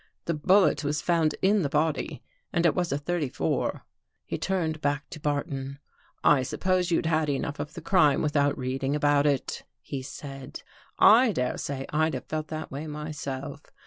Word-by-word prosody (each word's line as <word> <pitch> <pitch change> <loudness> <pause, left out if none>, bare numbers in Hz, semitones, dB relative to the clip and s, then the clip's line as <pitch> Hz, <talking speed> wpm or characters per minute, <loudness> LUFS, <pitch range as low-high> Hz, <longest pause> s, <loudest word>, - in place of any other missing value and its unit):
The 170 - 0
bullet 185 +4 +3
was 145 +1 0
found 165 -3 +1
in 200 +2 +4
the 145 - 0
body 155 +1 -1 0.3
and 170 -2 +1
it 170 - +5
was 175 -2 -1
a 140 - +1
thirty 150 -1 -2
four." - - -1 0.4
He - - -3
turned 165 -5 -1
back 145 0 -1
to - - -7
Barton. 145 -2 -2 0.2
" - - -36
I 145 -3 +5
suppose 180 +6 0
you'd 165 - +1
had 155 -1 +1
enough 145 +1 -2
of 150 +1 -5
the - - -6
crime 150 -8 +3
without 145 -2 +2
reading 135 +2 -1
about 145 0 +3
it," 140 -3 -1 0.2
he 135 - -5
said. 135 +1 -8 0.2
" - - -36 0.2
I 255 -3 +3
dare 125 -5 -1
say 135 -1 -4
I'd 155 +1 +1
have - - -6
felt 155 0 -3
that 155 0 -6
way 145 +4 -5
my 150 +1 -5
self. 140 0 -5
150 Hz, 190 wpm, -27 LUFS, 140-160 Hz, 0.4 s, it